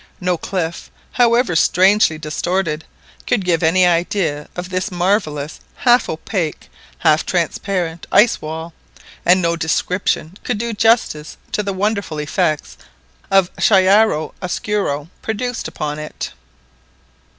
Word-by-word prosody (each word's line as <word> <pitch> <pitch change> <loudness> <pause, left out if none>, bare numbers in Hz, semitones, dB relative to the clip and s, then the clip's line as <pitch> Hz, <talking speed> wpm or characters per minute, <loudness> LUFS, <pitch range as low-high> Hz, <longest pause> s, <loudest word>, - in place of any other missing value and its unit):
No 180 -1 0
cliff, 170 -1 -4 0.2
however 240 -5 +3
strangely 185 0 +4
distorted, 160 +1 -2 0.4
could 210 -6 +1
give 170 -3 +2
any 180 +3 +4
idea 170 -3 0
of 180 +1 -6
this 185 0 -1
marvellous 175 -5 -1 0.2
half 245 -2 +3
opaque, 165 0 -3 0.3
half 155 - +3
transparent 175 -1 -2
ice 220 +2 +4
wall, 160 +2 -6 0.5
and 180 +1 +5
no 170 0 +2
description 170 +2 -1
could 245 - -1
do 235 +2 -3
justice 220 -9 +1
to - - 0
the 200 -1 -2
wonderful 200 -4 -1
effects 150 0 -1 0.5
of 195 -2 +3
chiara 195 -4 +4
oscuro 180 -5 -2
produced 235 +2 -3
upon 150 0 -4
it. 150 - -6
180 Hz, 115 wpm, -19 LUFS, 160-205 Hz, 0.5 s, and